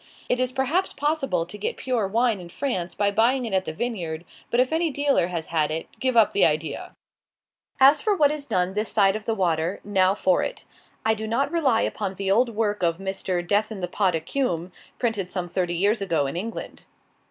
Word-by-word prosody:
It 250 - +1
is 255 0 0
perhaps 270 +9 0
possible 275 - 0
to 180 +5 -9
get 205 - -3
pure 245 -6 -1
wine 225 +1 +1
in 175 -1 -10
France 185 -6 -3
by 205 0 +1
buying 240 +5 +2
it 220 - -4
at 190 0 +1
the - - -3
vineyard; 170 -5 -4 0.2
but 235 - +1
if 255 +4 +2
any 330 +1 +2
dealer 285 - +1
has 170 -3 -4
had 155 -2 +2
it, 160 +1 -3
give 255 -2 0
up 220 -3 +5
the - - +3
idea! 155 -1 0 0.8
As 275 +6 +7
for 430 -2 +2
what 295 -5 +4
is 295 -2 -5
done 180 +1 0
this 210 +2 -1
side 195 -2 +4
of 215 0 -5
the 225 - 0
water, 170 -2 0
now 190 -1 +2
for 185 -3 +2
it. - - -5 0.4
I 220 - +4
do 220 0 -5
not 270 +6 0
rely 280 -9 +2
upon 195 -2 -2
the 195 0 -1
old 235 +5 +4
work 210 -2 -1
of 170 -2 +1
Mr. 190 -2 -3
"Death 210 +3 +1
in 215 - -5
the 180 - -2
pot 185 -1 +1
Accum," 175 - -2 0.3
printed 215 -7 -1
some 180 -2 -3
thirty 175 0 -1
years 200 +5 +2
ago, 165 -7 +1
in 135 - -4
England. 220 +6 -6
205 Hz, 215 wpm, -24 LUFS, 180-250 Hz, 0.8 s, As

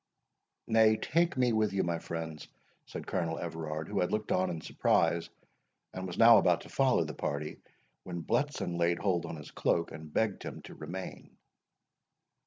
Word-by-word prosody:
"Nay, 110 -1 +5
take 170 +6 +1
me 125 -2 +3
with 110 -2 +1
you, 95 - +1
my 85 -1 -1
friends," 80 -2 -6 0.4
said - - -7
Colonel 85 -3 -1
Everard, 80 -2 -4
who - - -1
had 90 - +1
looked 105 0 -1
on 95 0 +2
in 80 - -3
surprise, 85 +1 +1 0.6
and 95 0 -4
was 90 - -6
now 115 -1 +9
about 90 -3 +3
to - - -12
follow - - +3
the - - -5
party, 75 +1 -3 0.4
when 85 -2 -6
Bletson 135 -12 -1
laid 85 0 +2
hold 90 -4 0
on - - -5
his 75 - -10
cloak, 85 0 0
and 80 0 -9
begged 105 +3 0
him - - -7
to - - -10
remain. 90 +5 -8
85 Hz, 175 wpm, -31 LUFS, 80-105 Hz, 0.6 s, now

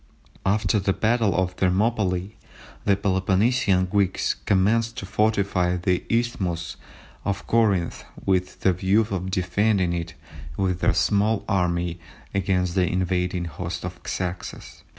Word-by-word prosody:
After 105 +2 +2
the 95 0 +1
battle 110 -2 +1
of 90 0 0
Thermopylæ 95 -1 +1 0.5
the 100 - +4
Peloponnesian 95 +1 +2
Greeks 95 0 +1
commenced 115 +5 +1
to 125 - -4
fortify 100 -4 +1
the 90 0 0
isthmus 95 -8 -1 0.5
of 100 0 -2
Corinth 100 -7 +1 0.2
with 90 -1 0
the 95 - +3
view 95 +4 +2
of 95 -1 -2
defending 95 0 +1
it 85 -1 -4 0.4
with 90 -2 0
their 85 - +2
small 100 +5 +2
army 90 -3 0 0.3
against 90 -2 0
the 90 -2 +1
invading 90 -1 0
host 85 +2 -5
of 90 -1 -6
Xerxes. 90 -9 -5
95 Hz, 125 wpm, -24 LUFS, 90-100 Hz, 0.5 s, the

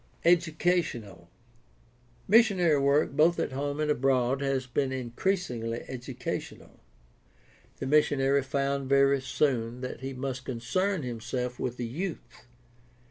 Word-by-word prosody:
EducationaL 160 - +1 0.5
— 120 0 -33
Missionary 185 -10 +5
work 140 +2 +3
both 160 +5 +3
at - - -1
home 145 +2 -3
and 150 -1 +1
abroad 135 -1 +1
has 135 -2 0
been 130 +2 -1
increasingly 125 - -2
educational. 130 0 -6 1.0
The - - -5
missionary 140 -1 +3
found 140 0 -2
very 140 0 +4
soon 125 -4 -1
that 125 - -5
he 135 +1 -5
must 130 0 -4
concern 145 +10 -1
himself 125 +1 -4
with 125 -1 -3
the 120 - -3
youth. 130 -3 -6
135 Hz, 120 wpm, -28 LUFS, 125-150 Hz, 1.0 s, Missionary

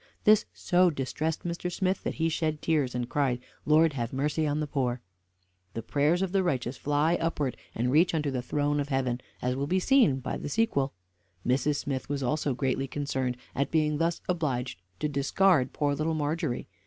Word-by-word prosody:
This 215 0 +5
so 180 0 +3
distressed 155 +2 -2
Mr. 175 +1 -3
Smith, 185 +1 0
that - - -2
he 165 - +1
shed 155 -1 -1
tears, 145 -6 +1
and 120 -1 -2
cried, 130 -3 0 0.3
"Lord, 155 +1 +5
have 120 -3 -3
mercy 150 +3 0
on 145 +1 0
the 155 - 0
poor!" 130 -4 -1 0.8
The 115 - -3
prayers 150 +9 +2
of 190 - -2
the 195 0 +2
righteous 130 -7 -1
fly 145 +5 +1
upwards, 150 -6 -1 0.2
and 125 +2 0
reach 165 +4 +4
unto 150 -3 0
the 130 -2 -2
throne 145 +3 0
of 145 0 -2
heaven, 130 -3 0 0.2
as 125 0 0
will 140 +2 -2
be 185 +4 +2
seen 225 - +4
by 130 - -3
the - - -5
sequel. 145 -10 +1 0.5
Mrs. 135 +4 +2
Smith 140 -3 -3
was 140 -1 -2
also 145 0 0
greatly 135 +1 -1
concerned 130 -3 -2 0.2
at 140 - 0
being 150 -2 +1
thus 165 0 0
obliged 135 - -2 0.2
to 150 - +1
discard 145 +1 +2
poor 145 -1 0
Little 155 +3 -1
Margery. 155 -3 -2
145 Hz, 190 wpm, -28 LUFS, 130-165 Hz, 0.8 s, This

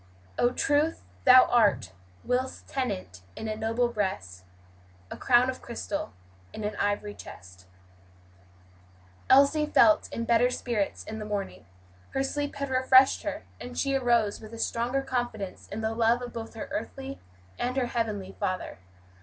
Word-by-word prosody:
"Oh 240 - +4
Truth, 290 +5 +1 0.2
Thou 255 -1 +9
art, 225 - +3 0.3
whilst 255 +1 -2
tenant 90 - -4
in 220 - -5
a 215 - -2
noble 225 +3 0
breast, 190 - -4 0.7
A - - -4
crown 245 0 +4
of 260 0 -4
crystal 220 - -4 0.4
in 215 - -6
an 210 +1 -2
iv'ry 205 0 -1
chest." 90 0 -12 1.6
Elsie 280 +3 +5
felt 315 +1 +4
in 230 - -3
better 235 +1 +4
spirits 235 -5 -2
in 220 0 -7
the - - -5
morning; 205 - -5 0.5
her 270 - +2
sleep 290 +1 -3
had 280 -1 -4
refreshed 260 +1 +5
her, 305 0 -4 0.2
and 245 0 -8
she 275 -1 0
arose 235 -5 +2
with 220 +1 -10
a - - -9
stronger 240 +4 -1
confidence 240 -7 -4
in 215 - -5
the 220 0 -1
love 230 +2 +2
of 245 - -7
both 225 0 -7
her 225 - -6
earthly 270 +5 -5 0.4
and 255 +2 -1
her 260 - +2
heavenly 215 -5 -3
Father. 185 - -3
235 Hz, 155 wpm, -28 LUFS, 210-260 Hz, 1.6 s, Thou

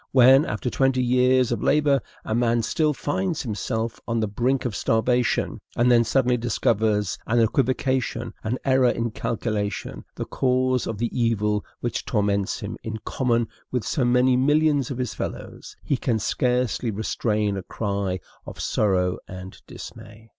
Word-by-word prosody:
When, 130 +2 +7
after 110 +4 -3
twenty 135 -1 +2
years 125 0 +3
of 120 - -1
labor, 145 -2 +3 0.2
a - - -2
man 120 0 +2
still 155 +6 +1
finds 165 +4 -2
himself 115 0 -3
on 115 0 0
the 110 - 0
brink 125 +6 0
of 115 -5 -2
starvation, 120 +2 +1
and 120 +1 +3
then 120 -1 +5
suddenly 125 +1 +2
discovers 110 -3 0
in 120 - +1
an 115 - +5
equivocation, 130 -1 0
an 115 +3 -1
error 130 -2 +4
in 115 -1 -1
calculation, 105 -2 -3
the - - -4
cause 130 -1 +1
of 115 - -3
the 115 +2 -2
evil 105 -3 +1 0.2
which 120 - -2
torments 100 -1 0
him 105 0 -5
in 110 0 -5
common 120 -3 0 0.2
with 125 -3 -1
so 135 - 0
many 125 +1 +4
millions 145 +1 +2
of 130 - -4
his 125 -4 -2
fellows, - - -7
he 140 - 0
can 120 -2 0
scarcely 125 +2 0
restrain 105 -1 -1
a 95 - -3
cry 100 -1 -2 0.3
of - - -9
sorrow 90 -4 +1
and 95 0 -9
dismay. 110 +2 -11
120 Hz, 160 wpm, -24 LUFS, 110-130 Hz, 0.3 s, When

